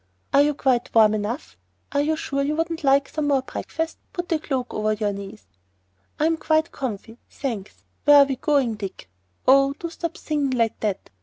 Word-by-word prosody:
"Are 280 - +7
you 295 0 +2
quite 255 -4 0
warm 215 -1 +6
enough! 215 +6 -4 0.3
Are 285 - +2
you 310 +2 +1
sure 275 -3 -2
you 290 +2 0
wouldn't 330 0 -2
like 275 0 +4
some 305 -2 -2
more 275 -2 +2
breakfast? 325 +4 -4
Put 350 -2 -4
the 325 - +1
cloak 260 -5 -3
over 215 0 0
you 210 -1 -1
knees." 200 +1 -9 0.7
"I'm 320 +2 +2
quite 315 0 +1
comf'y, 225 -2 -6
thanks. 225 -8 -5 0.2
Where 290 0 +8
are 280 - +8
we 270 -2 -3
going, 275 -6 +2
Dick? 190 - -7 0.4
Oh, 275 +1 +6
do 335 +3 -7
stop 335 -1 -5
singing 285 -4 -1
like 230 -2 +1
that. 205 -3 -3
275 Hz, 185 wpm, -23 LUFS, 225-305 Hz, 0.7 s, Where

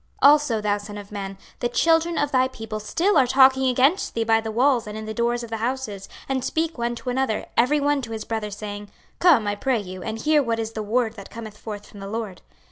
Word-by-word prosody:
26:033:030 280 - +10
Also, 290 -7 +2
thou 205 -1 +1
son 205 0 -8
of 205 0 -10
man, 195 -2 -5 0.2
the 240 - 0
children 330 +6 +2
of 290 -1 0
thy 255 -1 +3
people 225 -4 -6
still 330 - +2
are 260 - +4
talking 265 0 +5
against 270 +9 +2
thee 230 - +1
by 225 0 +3
the 220 - -5
walls 240 +1 +2
and 210 +1 -6
in 220 - -6
the 220 - -5
doors 235 +1 0
of 230 - -9
the 225 - -2
houses, 225 -4 -3 0.2
and 265 -2 -1
speak 325 +3 -1
one 240 0 -2
to 250 +2 -4
another, 255 -4 -1
every 290 +6 +3
one 290 0 +1
to 235 - -7
his 220 -1 -5
brother, 220 -2 -3
saying, 205 0 -7 0.3
Come, 315 -12 +5
I 205 - 0
pray 250 +5 0
you, 185 -2 -8
and 220 +2 -4
hear 300 +5 +3
what 230 -4 -1
is 225 -1 -3
the 220 - -4
word 220 +2 0
that 200 - -10
cometh 220 -2 -8
forth 210 -1 -8
from 205 - -13
the 195 - -7
LORD. 215 -4 -5
230 Hz, 250 wpm, -23 LUFS, 215-265 Hz, 0.3 s, 26:033:030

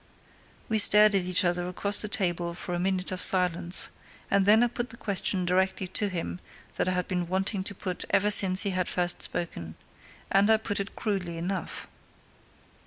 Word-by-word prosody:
We 220 -1 +1
stared 210 +1 +7
at 190 -2 +2
each 185 +1 +3
other 175 0 -1
across 200 +3 -1
the 210 - -1
table 175 -5 -2
for 180 - -6
a 175 - -2
minute 185 0 -1
of 185 - -4
silence, 180 -1 +1 0.4
and 200 -1 +2
then 220 +3 +6
I - - +3
put 240 +1 -5
the 235 - -9
question 195 -3 -1
directly 190 +1 0
to 205 +2 +2
him 165 - -5 0.4
that - - -1
I - - -1
had 180 0 -2
been 180 -2 -3
wanting 190 +2 -2
to 200 - -5
put 185 -1 -5
ever 210 +2 +2
since 190 -2 +5
he 200 - -1
had 185 -1 -2
first 175 -1 0
spoken. 85 - -3 0.6
And 200 +2 +3
I 220 - +6
put 210 -2 -4
it 200 - -6
crudely 185 -6 -3
enough. 180 +1 -5
185 Hz, 190 wpm, -27 LUFS, 180-200 Hz, 0.6 s, stared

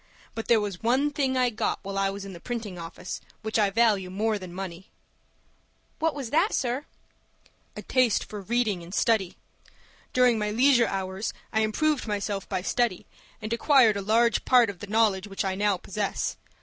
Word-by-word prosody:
But 225 - -5
there 230 -2 +5
was 200 -4 -4
one 260 +6 +2
thing 270 -3 0
I 250 -1 +2
got 215 - -1
while 195 0 -5
I 195 0 +1
was 200 0 -6
in 195 - -8
the 170 - -10
printing 220 -4 -5
office 170 +2 -7 0.2
which 220 +1 0
I 205 -2 +3
value 205 -3 +2
more 210 +3 -1
than 185 -2 -9
money." 185 0 -7 1.1
"What 320 -2 +1
was 265 -5 -5
that, 330 +8 +2
sir?" 255 +4 -1 0.9
"A - - -6
taste 255 -4 +2
for 210 -1 -7
reading 220 -3 0
and 170 +4 -8
study. 215 -6 +1 0.7
During 250 -3 +4
my 210 0 -1
leisure 240 +2 +4
hours 190 +2 -3 0.2
I 220 - +2
improved 260 +6 +1
myself 205 -2 -3
by 180 - -2
study, 235 -4 0 0.4
and 215 +2 -2
acquired 235 -3 +5
a 200 - -2
large 230 +4 +2
part 245 -5 +5
of 185 - -16
the 205 - -8
knowledge 210 -2 +2
which 195 0 -3
I 190 - 0
now 200 0 +1
possess. 200 +2 -3
215 Hz, 185 wpm, -26 LUFS, 195-240 Hz, 1.1 s, there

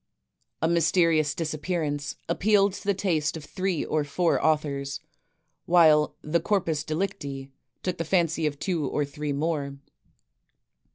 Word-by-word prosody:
"A - - +4
Mysterious 165 -2 +3
Disappearance," 155 -2 -2
appealed 200 +3 +3
to - - -8
the 200 -1 +2
taste 160 -5 0
of 150 - -9
three 185 0 -2
or 155 -1 0
four 160 +4 0
authors, 140 -3 0 0.7
while 160 -3 +5
"The 160 +3 +1
Corpus 165 -5 0
Delicti" 140 -5 -4 0.3
took 180 -2 -2
the - - 0
fancy 165 -2 +1
of 145 -1 -3
two 165 -3 -1
or 150 - 0
three 145 +1 -4
more. 140 -1 -2
155 Hz, 130 wpm, -26 LUFS, 145-175 Hz, 0.7 s, while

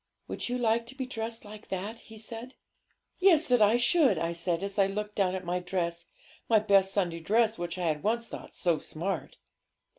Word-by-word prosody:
'"Would - - -4
you 250 - 0
like 230 -1 +1
to 265 - -9
be 265 -1 -3
dressed 225 -2 -5
like 210 +1 -11
that?" 200 +5 -4
he 220 - -13
said. 230 +3 -7 0.6
'"Yes, 350 -4 +5
that 245 -2 +4
I 210 +3 +6
should," 260 - +4
I 165 +1 -1
said, 170 +1 -1
as 200 +1 -3
I 195 - +5
looked 210 +1 -4
down 190 -3 +1
at 185 -1 -5
my 175 +1 0
dress 170 -2 -3 0.4
my 225 - +6
best 200 -2 +4
Sunday 175 -4 0
dress, 220 +5 +2
which 175 +1 -4
I 180 - -2
had 155 -2 0
once 230 +3 0
thought - - -9
so 170 -3 +1
smart. 170 -2 -4
205 Hz, 205 wpm, -29 LUFS, 180-230 Hz, 0.6 s, I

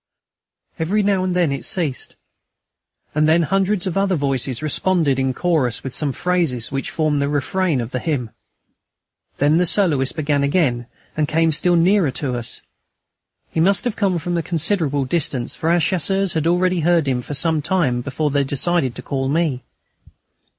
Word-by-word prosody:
Every 195 +6 +1
now 195 -2 +1
and 185 -1 -1
then 175 -5 +2
it 140 - -4
ceased, 155 -8 -3 1.0
and 155 +1 +2
then 165 +1 +4
hundreds 195 +2 0
of 185 - -3
other 195 -1 +1
voices 135 -3 -1
responded 155 -2 +1
in 130 0 +1
chorus 130 -5 0
with 130 - -5
some 150 -3 -1
phrases 170 -7 -1
which 135 0 -3
formed 155 -3 0
the 140 - 0
refrain 155 +2 0
of 120 0 -4
the 125 - -2
hymn. 125 -7 -2 1.1
Then 145 +3 +3
the 180 - +3
soloist 155 -9 +1
began 145 -2 0
again 140 -5 +1 0.3
and 155 -1 0
came 165 +1 +2
still 175 +4 +2
nearer 175 0 +3
to 135 -4 -2
us. 120 -1 -6 0.9
He - - -2
must 185 +2 +3
have 240 -4 -2
come 195 -4 0
from 175 +2 -3
a - - 0
considerable 160 -4 0
distance, 135 -4 -2
for 160 - -2
our 175 +1 +3
Chasseurs 190 +3 +1
had 160 0 0
already 180 +1 +2
heard 165 -2 +2
him 125 -2 0
some 150 +4 0
time 145 -7 0
before 140 +3 -2
they 140 0 +2
decided 140 -1 0
to - - -8
call 135 -1 -2
me. 150 -4 0
155 Hz, 170 wpm, -20 LUFS, 135-180 Hz, 1.1 s, then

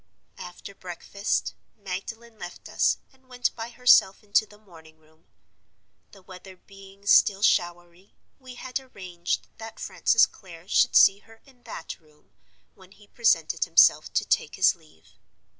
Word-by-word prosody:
"After 180 +2 -10
breakfast 195 +2 -4 0.2
Magdalen 220 +4 -8
left 175 -1 -10
us, - - +1 0.2
and 260 -1 -30
went 250 -1 -2
by 225 0 -6
herself 240 -6 +4
into 210 +1 +1
the 210 - -18
morning 165 -6 -18
room. 160 +1 -29 0.9
The 195 -2 -18
weather 185 0 -13
being 195 +1 -17
still 200 0 +4
showery, 175 0 -1 0.2
we 255 -2 -12
had 255 +1 -5
arranged 185 -9 -5
that 225 0 -10
Francis 225 - +2
Clare 175 -3 -15
should - - +2
see 195 +1 +6
her 225 +1 -21
in 260 -3 -23
that 165 - -8
room, 150 -2 -29 0.4
when 190 0 -19
he 205 - -20
presented 175 -10 +1
himself - - +4
to - - 0
take - - -1
his - - +3
leave. 80 +1 -25
195 Hz, 145 wpm, -25 LUFS, 175-225 Hz, 0.9 s, see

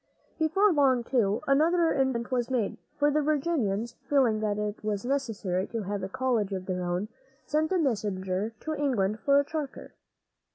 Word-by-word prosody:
Before 360 +6 +3
long, 265 -5 +3
too, 230 -4 +1
another 325 +4 +3
improvement 265 -2 0
was 245 -1 0
made; 245 -6 -1 0.2
for 290 0 +3
the 305 +1 +2
Virginians, 265 -8 0
feeling 255 -7 +3
that 210 -1 -1
it 210 0 -3
was 210 0 -2
necessary 225 -9 -1
to 230 -2 -4
have 200 +1 -3
a 190 - -4
college 225 -4 0
of 185 -1 -4
their 180 -1 -2
own, 175 +3 -1 0.4
sent 310 +2 0
a 375 - +3
messenger 205 - -1
to 315 - -3
England 225 -9 0
for 280 +4 +4
a 285 - +1
charter. 300 -2 -5
240 Hz, 170 wpm, -28 LUFS, 205-285 Hz, 0.4 s, for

